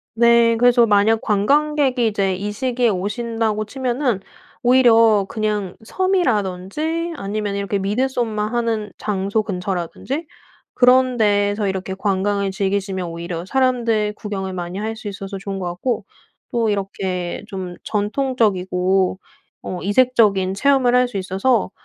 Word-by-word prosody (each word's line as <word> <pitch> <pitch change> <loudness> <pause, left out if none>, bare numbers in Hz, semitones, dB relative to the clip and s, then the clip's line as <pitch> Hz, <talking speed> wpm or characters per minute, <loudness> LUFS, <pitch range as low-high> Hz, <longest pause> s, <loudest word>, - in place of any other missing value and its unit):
네, 235 0 +4
그래서 240 0 +5
만약 215 +1 +3
관광객이 270 +3 +2
이제 195 -3 0
이 205 +3 -4
시기에 245 +1 0
오신다고 215 +2 -2
치면은 250 -1 -1 0.4
오히려 230 -5 +5
그냥 210 -4 -2
섬이라든지 315 - -1
아니면 205 -2 -3
이렇게 200 0 -2
미드소마 220 +1 -1
하는 225 -2 -2
장소 200 +1 -1
근처라든지 195 - -4 0.5
그런 255 0 +4
데서 205 -1 +2
이렇게 190 0 -3
관광을 200 0 0
즐기시면 190 -2 -2
오히려 170 0 -5
사람들 230 -3 +1
구경을 195 -3 -5
많이 180 0 -5
할 220 +2 -3
수 220 -1 -7
있어서 195 0 -6
좋은 195 0 -5
것 185 - -4
같고 180 +8 -2 0.5
또 230 -2 +1
이렇게 190 -3 -3
좀 185 -3 -6
전통적이고 195 -5 0 0.4
어 180 - -5
이색적인 205 -3 +3
체험을 260 +2 +3
할 250 0 +4
수 240 - -7
있어서 195 +4 0
210 Hz, 300 characters per minute, -20 LUFS, 195-240 Hz, 0.5 s, 그래서